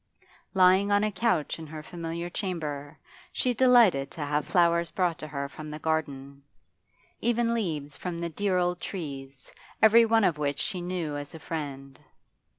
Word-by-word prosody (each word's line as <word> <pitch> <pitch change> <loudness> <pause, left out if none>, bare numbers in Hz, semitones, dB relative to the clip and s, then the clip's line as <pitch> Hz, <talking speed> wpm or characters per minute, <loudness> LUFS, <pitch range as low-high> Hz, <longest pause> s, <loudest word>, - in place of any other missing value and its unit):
Lying 190 +2 +5
on 205 0 +4
a 215 - +1
couch 190 -8 0
in 160 - -8
her 155 0 -8
familiar 170 0 -5
chamber, 155 -6 -4 0.3
she 250 - 0
delighted 230 - +5
to 160 - -9
have 145 +1 -1
flowers 170 -1 +3
brought 175 -3 0
to 155 - -6
her 140 -2 -4
from 155 +3 -9
the 150 - -6
garden, 140 -3 -3 0.8
even 235 0 +1
leaves 155 -10 -3
from 180 -2 -4
the 170 0 -3
dear 190 +2 0
old 180 0 0
trees, 135 -7 -7 0.3
every 225 +1 +7
one 225 0 +4
of 165 -6 +2
which 145 -1 -1
she 180 - -2
knew 175 -4 -3
as 145 +2 -7
a - - -8
friend. 140 -4 -6
170 Hz, 165 wpm, -28 LUFS, 145-190 Hz, 0.8 s, every